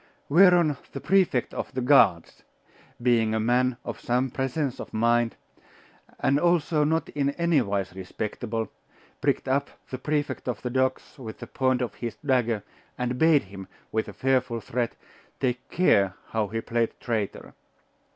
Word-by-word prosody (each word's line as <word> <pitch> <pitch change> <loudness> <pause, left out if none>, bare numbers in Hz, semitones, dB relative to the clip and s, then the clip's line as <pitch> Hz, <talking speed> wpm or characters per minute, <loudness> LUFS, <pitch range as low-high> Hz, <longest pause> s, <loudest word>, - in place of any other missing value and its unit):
Whereon 170 -2 +5 0.2
the 140 - -4
Prefect 185 -10 +2
of - - -4
the 130 - 0
Guards, 125 - +4 0.6
being 115 -3 +2
a - - +1
man 125 +2 +2
of - - -5
some 125 +1 0
presence 135 +1 -2
of - - -7
mind, 120 +1 +2 0.8
and 140 +2 +2
also 170 -3 +2
not 160 +2 0
in 140 -1 0
anywise 110 - +1
respectable, 110 +4 -4 0.5
pricked - - 0
up 140 +2 +1 0.2
the 130 - -4
Prefect 150 0 -2
of 120 -4 -2
the 125 - -2
docks 130 +2 -1
with 110 -4 -7
the - - -8
point 130 -1 0
of 120 - -4
his 115 -3 -5
dagger, 120 -6 +1 0.3
and 125 0 -2
bade 160 -3 +5
him, 95 -1 -10 0.2
with 110 0 -1
a - - -8
fearful 130 -3 0
threat, 115 +2 -2 0.4
take 125 -2 -2
care 100 - +3
how 110 -2 0
he 115 +3 -3
played 115 0 -1
traitor. 110 -5 -3
125 Hz, 150 wpm, -26 LUFS, 115-140 Hz, 0.8 s, Whereon